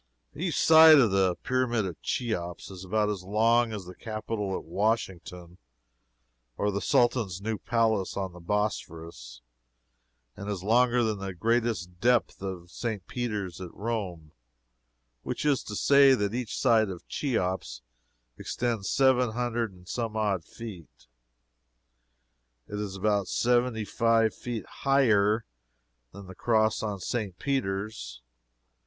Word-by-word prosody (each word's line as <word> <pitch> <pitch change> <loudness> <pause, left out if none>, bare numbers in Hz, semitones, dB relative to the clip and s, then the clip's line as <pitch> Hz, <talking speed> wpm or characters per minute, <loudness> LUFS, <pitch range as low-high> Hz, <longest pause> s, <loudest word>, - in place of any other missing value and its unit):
Each - - -2
side 160 -1 +8
of 120 -7 +4
the 95 -2 +2
Pyramid 125 -4 0
of 85 -5 -7
Cheops 90 -8 -3
is 95 -1 -9
about 105 +3 0
as 100 -3 -4
long 115 +4 +2
as 105 -4 -6
the 90 - -9
Capitol 110 -2 -4
at - - -8
Washington, 90 -5 -3 1.0
or 105 0 0
the 100 0 -2
Sultan's 120 -8 +1
new 110 +1 -3
palace 110 -5 0
on 95 -2 -3
the 90 - -11
Bosporus, 85 - -4 0.9
and 100 +1 -7
is 100 -3 -4
longer 120 +3 +3
than 110 -3 -1
the 95 -1 -5
greatest 110 -3 -1
depth 120 -1 +2
of 90 -3 -6
St. 110 -6 -4
Peter's 105 -7 -4
at 90 -2 -7
Rome 95 -8 -4 0.9
which - - -4
is 145 -3 +2
to 105 - -6
say 140 +3 +6
that 105 -3 -1
each 120 -2 -3
side 115 -5 +3
of 90 -3 -8
Cheops 90 - -2 0.6
extends 115 -5 -2
seven 130 -4 +3
hundred 120 -2 -1
and 90 -1 -18
some 115 0 -3
odd 100 -5 0
feet. 100 -5 -11 1.6
It 105 - -5
is 100 -2 -4
about 100 -1 0
seventy 120 -2 +1
five 115 0 +2
feet 120 -3 -5
higher 110 -6 +2 0.7
than 100 +6 -11
the 95 - -10
cross 110 +2 +1
on 105 -3 -3
St. 100 -2 -3
Peter's. 95 - -3
105 Hz, 135 wpm, -28 LUFS, 95-120 Hz, 1.6 s, side